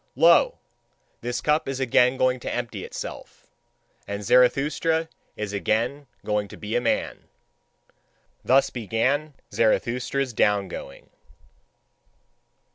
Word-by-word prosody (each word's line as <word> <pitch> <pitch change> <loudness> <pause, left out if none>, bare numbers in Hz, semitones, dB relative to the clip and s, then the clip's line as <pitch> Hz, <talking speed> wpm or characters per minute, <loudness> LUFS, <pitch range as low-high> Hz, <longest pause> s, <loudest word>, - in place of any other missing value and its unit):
Lo! - - +5 0.6
This 120 0 -3
cup 150 0 +1
is 135 -1 -3
again 125 0 +3
going 130 0 +2
to - - -5
empty 120 -1 -4
itself, - - -8 0.6
and 100 +1 -4
Zarathustra 145 +8 +2 0.3
is 105 -1 -5
again 115 +8 -1 0.2
going 105 -1 0
to - - -12
be 105 +1 -4
a 120 - +2
man. 120 - -1 1.2
Thus 135 +2 +3
began 130 +6 -1 0.2
Zarathustra's 125 +3 0
down 100 -2 +2
going. 70 - -9
125 Hz, 110 wpm, -24 LUFS, 110-135 Hz, 1.2 s, Lo